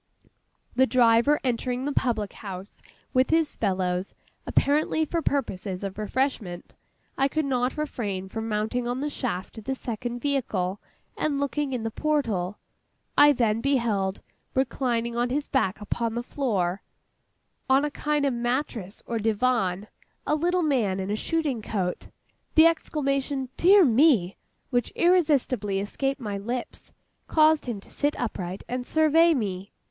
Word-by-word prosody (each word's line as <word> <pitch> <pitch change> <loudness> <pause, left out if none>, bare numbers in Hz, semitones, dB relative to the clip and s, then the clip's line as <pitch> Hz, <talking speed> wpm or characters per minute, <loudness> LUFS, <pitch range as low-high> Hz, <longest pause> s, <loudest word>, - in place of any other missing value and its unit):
The 260 +1 +4
driver 240 +4 +4
entering 250 +1 -1
the 290 - -1
public 225 -7 0
house 195 -1 -9 0.3
with 255 0 +3
his 325 -2 +2
fellows, 185 -2 -1 0.3
apparently 305 +2 +2
for 335 +2 -1
purposes 200 - -2
of 195 +1 -5
refreshment, 215 -5 -2 0.4
I 270 - +4
could 310 +2 -1
not 250 -1 0
refrain 205 -11 -3
from 225 +3 -5
mounting 220 +3 -1
on 245 +1 -2
the 295 +2 -2
shaft 220 -5 -4
of 215 - -13
the 265 - -1
second 240 0 -4
vehicle, 210 -9 -1 0.3
and 290 -2 -1
looking 285 0 -1
in 250 -3 -2
at - - -6
the 225 - -2
portal. 225 - 0 0.6
I 290 0 +8
then 230 -4 +1
beheld, 225 -8 0 0.3
reclining 240 -3 0
on 240 +1 +1
his 285 +3 -1
back 215 -8 0
upon 225 +2 -2
the 240 - -2
floor, 200 -9 -1 0.9
on 270 +2 +4
a 295 - -2
kind 295 -1 0
of 275 - +1
mattress 240 -4 -3
or 230 -1 -2
divan, 215 -3 +1 0.4
a - - +1
little 350 +3 +1
man 230 -11 +1
in 190 +1 -3
a - - +1
shooting 290 -1 -1
coat. 190 -4 -3 0.5
The 315 - +8
exclamation 275 -4 0
'Dear 385 +1 +6
me' 235 - +4 0.4
which 245 -1 0
irresistibly 280 - +2
escaped 270 +7 -2
my 205 -5 -4
lips 240 +4 -5 0.4
caused 310 -2 +4
him 230 -4 -3
to - - -15
sit 290 +1 -1
upright, 190 -6 -4
and 250 0 -3
survey 315 +4 +4
me. 195 -5 -3
245 Hz, 150 wpm, -26 LUFS, 210-285 Hz, 0.9 s, I